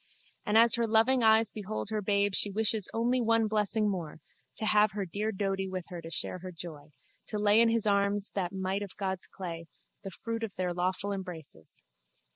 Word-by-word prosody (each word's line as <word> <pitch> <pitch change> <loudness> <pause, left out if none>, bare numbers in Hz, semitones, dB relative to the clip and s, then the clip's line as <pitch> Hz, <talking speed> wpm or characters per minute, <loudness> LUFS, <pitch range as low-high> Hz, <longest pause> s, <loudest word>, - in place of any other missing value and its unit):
And 210 +1 +3
as 230 0 +7
her 235 -1 +1
loving 230 +4 +4
eyes 220 0 +5
behold 210 0 -4
her 215 -1 -1
babe 200 0 +1
she 205 - +2
wishes 215 0 0
only 240 +2 +1
one 230 -1 +3
blessing 215 0 +2
more, 175 -7 -4 0.4
to 220 - -3
have 210 -2 +4
her 200 -1 -3
dear 205 +5 -3
Doady 195 -1 -2
there - - -8
with 185 -2 -4
her 175 -2 -7
to 165 - -9
share 165 +2 -3
her 185 +1 -8
joy, 155 -4 -10 0.4
to 210 - -3
lay 210 +1 +5
in 230 - +5
his 230 -1 0
arms 200 0 +1
that 185 -3 -2
mite 190 +1 -2
of 200 -2 -8
God's 190 -2 -3
clay, 170 -3 -7 0.4
the 195 - -5
fruit 230 +5 -5
of 225 -4 -5
their 180 -1 -2
lawful 185 +3 -1
embraces. 175 - -8
200 Hz, 205 wpm, -30 LUFS, 185-220 Hz, 0.4 s, as